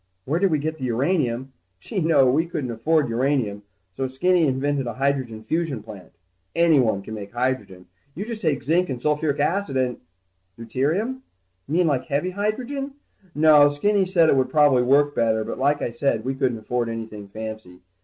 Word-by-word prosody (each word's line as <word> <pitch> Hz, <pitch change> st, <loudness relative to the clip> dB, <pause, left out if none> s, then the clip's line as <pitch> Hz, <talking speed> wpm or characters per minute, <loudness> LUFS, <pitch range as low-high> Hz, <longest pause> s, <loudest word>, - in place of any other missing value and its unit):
Where 155 Hz, +5 st, 0 dB
did 195 Hz, 0 st, +3 dB
we 155 Hz, -, +2 dB
get 155 Hz, +2 st, -3 dB
what -, -, -13 dB
uranium? 130 Hz, 0 st, -1 dB, 0.3 s
Gee, 185 Hz, -, -4 dB
no, 155 Hz, -4 st, +4 dB
we 155 Hz, +7 st, +2 dB
couldn't 145 Hz, -8 st, -4 dB
afford 150 Hz, +6 st, +1 dB
uranium, 120 Hz, -4 st, 0 dB, 0.3 s
so 135 Hz, -, -2 dB
Skinny 170 Hz, +5 st, +2 dB
invented 135 Hz, 0 st, -1 dB
a 120 Hz, -, -4 dB
hydrogen 130 Hz, -5 st, -1 dB
fusion 155 Hz, -6 st, -2 dB
plant. 100 Hz, -5 st, -11 dB, 0.4 s
Anyone 135 Hz, -12 st, +3 dB
can 110 Hz, -, -8 dB
make 100 Hz, -1 st, -8 dB
hydrogen. 120 Hz, -7 st, -2 dB, 0.3 s
You 200 Hz, +6 st, -4 dB
just 225 Hz, -1 st, -6 dB
take 155 Hz, -5 st, 0 dB
zinc 170 Hz, +4 st, +1 dB
and 130 Hz, -2 st, -3 dB
sulfuric 150 Hz, +1 st, 0 dB
acid 165 Hz, -2 st, 0 dB
and... 125 Hz, -2 st, 0 dB, 0.6 s
Deuterium? 155 Hz, -, -1 dB, 0.5 s
You 145 Hz, -, -5 dB
mean 180 Hz, 0 st, +3 dB
like 135 Hz, -5 st, 0 dB
heavy 145 Hz, +8 st, -1 dB
hydrogen? 250 Hz, +8 st, -3 dB, 0.4 s
No, 150 Hz, -1 st, +6 dB
Skinny 195 Hz, +7 st, +1 dB
said 175 Hz, -3 st, +4 dB
it -, -, +4 dB
would 130 Hz, -1 st, +1 dB
probably 145 Hz, -4 st, +4 dB
work 145 Hz, +3 st, +3 dB
better, 110 Hz, -3 st, +1 dB
but -, -, -6 dB
like 145 Hz, +2 st, +1 dB
I -, -, -2 dB
said, 120 Hz, -2 st, -1 dB
we 135 Hz, -, -1 dB
couldn't 130 Hz, -3 st, 0 dB
afford 120 Hz, +2 st, -2 dB
anything 110 Hz, -3 st, -6 dB
fancy. 110 Hz, -3 st, -8 dB
140 Hz, 180 wpm, -23 LUFS, 120-160 Hz, 0.6 s, No